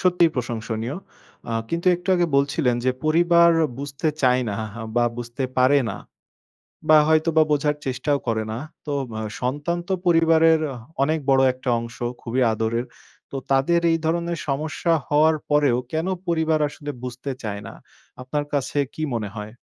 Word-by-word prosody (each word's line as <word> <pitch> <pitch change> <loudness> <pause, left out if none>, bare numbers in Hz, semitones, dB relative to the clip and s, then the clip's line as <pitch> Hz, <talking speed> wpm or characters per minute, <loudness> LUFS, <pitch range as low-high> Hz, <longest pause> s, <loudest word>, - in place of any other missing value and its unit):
সত্যিই 180 -3 +4
প্রশংসনীয়। 115 +1 -3 0.5
আ - - -2 0.2
কিন্তু 170 +2 -3
একটু 180 +2 -14
আগে 175 -1 +2
বলছিলেন 140 -3 +1
যে 130 - +3
পরিবার 170 +2 +5 0.3
বুঝতে 140 +2 -2
চায় 125 0 +4
না 100 - -3 0.4
বা 120 - +4
বুঝতে 120 +2 -4
পারে 130 +3 +5
না। - - -5 0.9
বা 155 - +8
হয়তোবা 160 0 +4
বোঝার 150 0 +2
চেষ্টাও 135 +2 0
করে 110 -1 0
না। 110 - -3 0.3
তো 145 - -3 0.5
সন্তান 145 +7 -1
তো 190 - 0
পরিবারের 165 -1 +5 0.4
অনেক 155 +2 +1
বড় 135 0 +5
একটা 130 0 -5
অংশ, 115 +2 -8 0.2
খুবই 125 +2 -1
আদরের। 115 +2 -1 0.5
তো 135 - -4
তাদের 140 +6 +3
এই 165 - +3
ধরনের 170 +1 -1
সমস্যা 155 +4 0
হওয়ার 155 +2 +4
পরেও 145 -4 +3
কেন 160 +3 -1 0.2
পরিবার 160 -2 +1
আসলে 145 0 -7
বুঝতে 125 +2 -5
চায় 100 -1 -4
না? 115 - -9 0.5
আপনার 145 +3 -2
কাছে 145 0 -1 0.2
কি 155 - -4
মনে 110 -3 -2
হয়? 105 0 -6
145 Hz, 155 wpm, -23 LUFS, 125-160 Hz, 0.9 s, বা